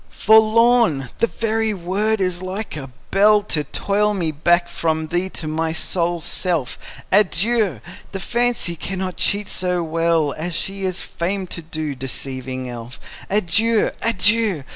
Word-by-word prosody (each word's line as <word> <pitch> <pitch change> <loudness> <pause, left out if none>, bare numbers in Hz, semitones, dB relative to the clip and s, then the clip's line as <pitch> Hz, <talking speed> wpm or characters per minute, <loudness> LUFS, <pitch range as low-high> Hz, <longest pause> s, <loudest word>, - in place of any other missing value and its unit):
Forlorn! 220 - +4
the 230 - +3
very 225 -1 -1
word 200 +5 -1
is 180 -1 0
like 190 +2 -5
a 135 -3 -7 0.2
bell 210 +1 +5
To 155 -7 -1
toll 205 +7 0
me 170 -5 -1
back 175 +4 +2
from 160 -2 -1
thee 175 +2 0
to 160 - -4
my 160 +1 -1
sole 175 0 0
self! 160 -4 -1 0.3
Adieu! 200 - +2 0.3
the 195 - -4
fancy 240 -5 0
cannot 185 +1 -4
cheat 205 0 +1
so 180 -1 0
well 165 -2 +1
As 165 +2 -4
she 195 +2 -2
is 185 -1 -2
famed 185 +2 -3
to 170 - -3
do, 155 -2 -4
deceiving 130 -1 -4
elf. 120 -1 -8 0.3
Adieu! 215 +3 +2
adieu! 215 -6 +2
180 Hz, 140 wpm, -20 LUFS, 160-210 Hz, 0.3 s, bell